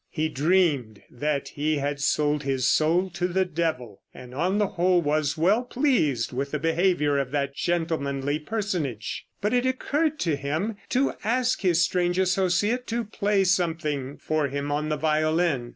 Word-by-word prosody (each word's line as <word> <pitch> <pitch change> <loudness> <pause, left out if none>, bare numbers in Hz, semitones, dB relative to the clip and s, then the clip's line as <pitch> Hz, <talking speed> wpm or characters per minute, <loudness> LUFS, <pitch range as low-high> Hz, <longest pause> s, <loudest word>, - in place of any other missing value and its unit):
He 155 -1 -1
dreamed 145 - +1
that 140 +2 -2
he 150 +1 -1
had 140 0 -2
sold 150 +1 +1
his 135 -3 -1
soul 165 +6 +2
to 175 +1 -1
the 190 +1 +1
devil, 155 - -3
and 125 -1 -11
on 180 +8 0
the 210 -2 +1
whole 180 0 +2
was 150 -1 0
well 190 +9 +3
pleased 240 - +1
with 135 +3 -2
the 150 - -2
behavior 160 -2 +1
of 135 -2 -2
that 140 0 -1
gentlemanly 150 -5 -1
personage. 160 - -3
But 210 +3 0
it 250 +1 +2
occurred 295 +4 0
to 165 -4 +1
him 155 +10 -2
to 265 +2 +1
ask 250 +3 +1
his 175 -4 +3
strange 175 +1 0
associate 190 +6 +1
to 235 +1 -1
play 205 -2 0
something 160 -7 -1
for 155 +1 -1
him 140 +1 -3
on 150 +1 -1
the 155 - 0
violin. 155 -3 +1
160 Hz, 165 wpm, -25 LUFS, 140-190 Hz, -, well